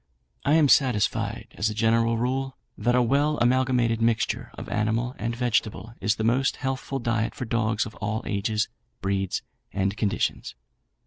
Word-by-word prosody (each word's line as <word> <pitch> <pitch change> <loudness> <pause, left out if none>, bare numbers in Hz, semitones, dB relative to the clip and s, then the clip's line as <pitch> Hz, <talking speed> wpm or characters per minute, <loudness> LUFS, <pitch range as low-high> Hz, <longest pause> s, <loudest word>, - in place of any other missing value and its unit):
"I 145 - +3
am 155 -3 +5
satisfied 125 -7 +2
as 105 +1 +2
a 105 - -5
general 115 +1 +2
rule, 130 +3 -1 0.2
that 120 +3 +1
a 125 - +4
well 145 +5 +2
amalgamated 120 -2 +2
mixture 115 0 +1
of - - -8
animal 115 +4 0
and 115 +2 -2
vegetable 115 -3 -1
is 105 +2 +2
the 110 - -3
most 125 +4 +2
healthful 135 0 -3
diet 115 -3 -1
for 125 - -4
dogs 115 -1 0
of 110 - -8
all 110 +1 -2
ages, 105 +1 0 0.4
breeds, 95 -1 -1 0.3
and 95 +1 0
conditions. 105 -2 -1
115 Hz, 155 wpm, -26 LUFS, 110-125 Hz, 0.4 s, am